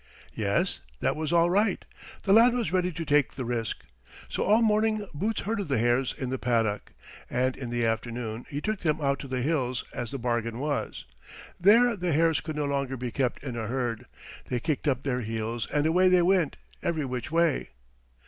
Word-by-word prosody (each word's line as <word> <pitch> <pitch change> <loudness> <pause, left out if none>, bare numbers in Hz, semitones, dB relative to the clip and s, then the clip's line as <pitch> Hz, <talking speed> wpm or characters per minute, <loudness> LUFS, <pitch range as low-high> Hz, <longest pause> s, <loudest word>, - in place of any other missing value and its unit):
Yes, 100 -2 0 0.2
that - - +1
was 155 0 -3
all 170 0 +4
right. 200 0 +1 0.4
The 195 - +3
lad 235 +3 +6
was 230 -10 -1
ready 180 -1 +2
to 165 0 -5
take 145 -4 +3
the 130 - -4
risk, 115 -2 -3 0.5
so - - -3
all 220 +3 +4
morning 215 -1 +2
Boots 205 +9 -1
herded 210 -3 -2
the 135 -3 +1
hares 120 +3 +2
in 130 -3 -3
the 130 - -2
paddock, 115 -4 0 0.4
and 130 +1 0
in 125 -3 -6
the 120 -1 0
afternoon 115 0 -3
he 145 +1 -4
took 215 +2 -2
them 155 -2 0
out 140 -2 0
to - - -7
the 130 -1 -2
hills, 130 -5 0
as 120 -2 -4
the 135 - -4
bargain 120 -2 -1
was. 145 +2 -3 0.5
There 230 +6 +5
the 180 -4 -1
hares 165 +1 +3
could 155 -1 -5
no 150 -1 -1
longer 140 -2 -1
be 125 0 -4
kept 125 0 -1
in 130 -4 -4
a 110 -2 -3
herd. 120 -2 -2 0.4
They 125 - -2
kicked 150 +3 -2
up 130 -2 +1
their 125 -3 -1
heels 115 +1 -3
and 145 0 +1
away 180 +3 +4
they 180 -1 +5
went, 180 -4 +2 0.2
every 160 -4 -1
which 125 +1 -4
way. 165 -2 +2
140 Hz, 200 wpm, -27 LUFS, 120-175 Hz, 0.5 s, lad